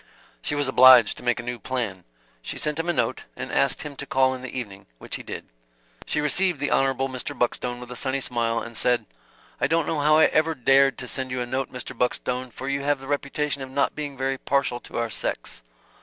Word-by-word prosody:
She 150 - -2
was 145 -1 0
obliged 130 -3 +8
to - - -10
make 120 -1 +1
a - - -5
new 120 0 -4
plan. 110 -7 -3 0.4
She - - -5
sent 150 +1 -1
him 165 +2 -1
a - - +3
note, - - -1
and - - -6
asked - - +2
him 150 -2 -7
to 140 - -5
call 130 0 +3
in 130 - -7
the 130 - -6
evening 100 -5 -7
which - - -5
he - - -9
did. - - -7 0.6
She - - 0
received 175 +2 +2
the 145 - -1
Hon. 135 0 +3
Mr. 130 -2 -5
Buckstone 120 0 -1
with 125 0 -10
a - - -6
sunny 130 +2 -1
smile, 115 -3 0
and 115 +1 -5
said: 125 +2 +1 0.5
"I - - +2
don't 165 -1 +2
know 155 - -1
how 150 +1 +5
I 160 - +7
ever 160 +1 +2
dared 135 +1 +4
to 125 - -6
send 130 0 -2
you 125 0 -3
a 125 - -1
note, 130 +1 -3
Mr. 125 +1 -6
Buckstone, 125 +1 -1
for 130 +3 -8
you 140 0 -1
have 145 0 +1
the 135 - -10
reputation 145 0 -2
of 130 - -6
not 140 +1 +1
being 145 -2 -5
very 135 0 -1
partial 140 -3 0
to - - -9
our 115 -1 -1
sex." - - -4
130 Hz, 235 wpm, -25 LUFS, 125-140 Hz, 0.6 s, obliged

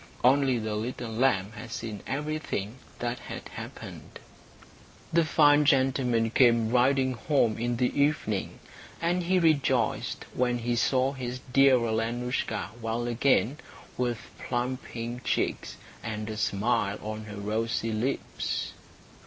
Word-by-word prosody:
Only 130 0 +4
the 110 -1 -3
little 115 +2 -4
lamb 110 -4 +2
had 115 0 -9
seen 110 -3 -5
everything 145 -7 -3 0.2
that 120 0 -3
had - - -8
happened. - - -9 1.0
The 170 0 +5
fine 150 -2 +5
gentleman 130 -5 +2
came 115 -3 +4
riding 130 +1 +3
home 120 -2 +1
in 120 0 -1
the 125 +3 0
evening, 140 -9 0 0.4
and 175 +2 +1
he 185 +2 +2
rejoiced 140 -8 +1
when 125 -1 +1
he 120 0 -1
saw 130 +3 +2
his 125 -2 -5
dear 135 -1 +6
Alenoushka 115 -4 -1
well 115 +1 -2
again, 125 +3 +2 0.4
with 120 -2 -2
plump 125 +1 -2
pink 120 +1 -6
cheeks, - - -1 0.2
and 110 -1 -4
a - - -4
smile 105 0 +1
on 110 0 -5
her 105 -1 -8
rosy 110 +2 -1
lips. 120 +6 -2
120 Hz, 130 wpm, -28 LUFS, 115-135 Hz, 1.0 s, dear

